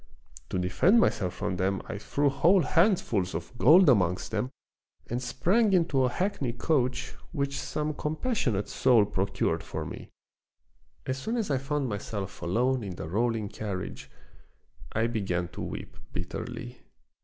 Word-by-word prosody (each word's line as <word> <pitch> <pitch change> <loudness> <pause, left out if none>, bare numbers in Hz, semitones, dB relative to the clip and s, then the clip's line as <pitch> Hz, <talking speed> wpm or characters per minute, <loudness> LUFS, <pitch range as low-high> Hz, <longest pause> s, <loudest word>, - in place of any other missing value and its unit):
To - - -2
defend 95 - +4
myself 95 - +1
from 90 - -2
them 95 +1 0
I 100 - -5
threw 145 +6 0
whole 175 +6 +4
handfuls 140 - +2
of 85 +9 -6
gold 180 +4 +7
amongst 90 -8 +3
them 110 +3 -1 0.6
and 120 +2 -2
sprang 185 - +2
into 165 -7 +3
a 125 - +3
hackney 160 - -1
coach 125 -1 0 0.2
which 140 -3 -2
some 150 0 -2
compassionate 150 - -1
soul 115 -5 +4
procured 95 0 -1
for - - -5
me. - - -8 1.0
As 130 +1 -2
soon 225 - -2
as 215 -9 -1
I 135 - +2
found 140 0 -1
myself 100 -2 -5
alone 120 +8 +1
in 95 -3 -5
the 80 - -6
rolling 110 +3 0
carriage 100 -3 -5 0.8
I 115 +1 +1
began 95 -7 -1
to - - -8
weep - - -6 0.2
bitterly. - - -6
125 Hz, 145 wpm, -28 LUFS, 100-150 Hz, 1.0 s, gold